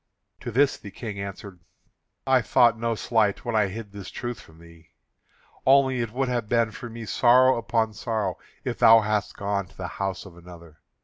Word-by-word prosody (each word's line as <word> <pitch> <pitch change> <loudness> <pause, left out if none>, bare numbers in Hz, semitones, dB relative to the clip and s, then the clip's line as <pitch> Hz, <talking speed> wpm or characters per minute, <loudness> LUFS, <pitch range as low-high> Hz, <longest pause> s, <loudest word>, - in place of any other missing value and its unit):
To - - -6
this 135 +5 +2
the 105 - -10
King 105 -1 -7
answered: 100 -1 -8 0.7
"I - - +4
thought 120 -1 +4
no 115 0 -2
slight 110 -2 0
when 120 -2 -2
I 105 -2 +3
hid 105 +1 -8
this 100 -2 -9
truth 120 -3 -6
from 80 - -18
thee. 85 0 -18 0.7
Only 135 -1 +4
it 115 - -3
would 130 +3 -1
have 120 -4 -2
been 115 -2 +2
for 120 +2 -8
me 115 0 -8
sorrow 130 +3 +4
upon 115 -1 -1
sorrow 105 -4 -3 0.2
if - - -4
thou 115 0 +7
hadst 105 -1 -2
gone 100 -1 -2
to 95 - -23
the 95 - -5
house 95 0 -3
of 95 -3 -13
another. 85 -2 -14
110 Hz, 190 wpm, -25 LUFS, 100-120 Hz, 0.7 s, thou